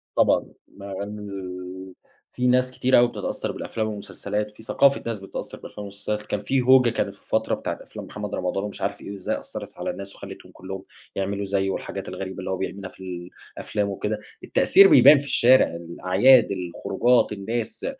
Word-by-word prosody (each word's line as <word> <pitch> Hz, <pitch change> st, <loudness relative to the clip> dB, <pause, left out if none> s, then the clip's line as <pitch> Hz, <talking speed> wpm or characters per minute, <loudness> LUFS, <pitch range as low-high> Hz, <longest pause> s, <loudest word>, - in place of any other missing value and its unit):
طبعًا، -, -, +3 dB, 0.2 s
مع 100 Hz, 0 st, -10 dB
ال 95 Hz, -3 st, -7 dB, 0.4 s
في 125 Hz, 0 st, 0 dB
ناس 125 Hz, 0 st, +3 dB
كتير 130 Hz, 0 st, +3 dB
أوي 120 Hz, -, +5 dB
بتتأثر 120 Hz, -, -4 dB
بالأفلام 110 Hz, -1 st, -3 dB
والمسلسلات، 105 Hz, 0 st, -4 dB
في 105 Hz, -, -16 dB
ثقافة 140 Hz, +4 st, +3 dB
ناس 115 Hz, -2 st, -3 dB
بتتأثر 95 Hz, -, -7 dB
بالأفلام -, -, -11 dB
والمسلسلات، 100 Hz, +1 st, -4 dB
كان 105 Hz, -1 st, -3 dB
في 135 Hz, +4 st, +1 dB
هوجة 130 Hz, -1 st, +6 dB
كانت 115 Hz, -, -2 dB
في -, -, -25 dB
فترة -, -, +1 dB
بتاعة -, -, -4 dB
أفلام -, -, -9 dB
محمد -, -, -5 dB
رمضان 90 Hz, +2 st, -2 dB
ومش 105 Hz, -1 st, -6 dB
عارف 100 Hz, 0 st, -2 dB
إيه، -, -, -7 dB
وإزاي 100 Hz, -2 st, -3 dB
أثّرت -, -, -8 dB
على -, -, -3 dB
الناس 100 Hz, 0 st, -7 dB
وخلتهم -, -, -11 dB
كلّهم 95 Hz, +1 st, -8 dB, 0.3 s
يعملوا 100 Hz, +1 st, -2 dB
زيه 95 Hz, 0 st, 0 dB
والحاجات 95 Hz, -, -4 dB
الغريبة 95 Hz, 0 st, -6 dB
اللي 95 Hz, -, -5 dB
هو 95 Hz, -, -1 dB
بيعملها 95 Hz, 0 st, -5 dB
في 90 Hz, -2 st, -8 dB, 0.3 s
الأفلام 105 Hz, -1 st, -2 dB
وكده، 105 Hz, +2 st, -3 dB, 0.2 s
التأثير 195 Hz, 0 st, +6 dB
بيبان 150 Hz, -, +8 dB
في 140 Hz, -, -7 dB
الشارع، 130 Hz, -1 st, +5 dB
الأعياد، 95 Hz, +9 st, +4 dB
الخروجات، 100 Hz, +7 st, +1 dB
الناس، 110 Hz, +3 st, -3 dB
100 Hz, 175 wpm, -24 LUFS, 95-115 Hz, 0.4 s, بيبان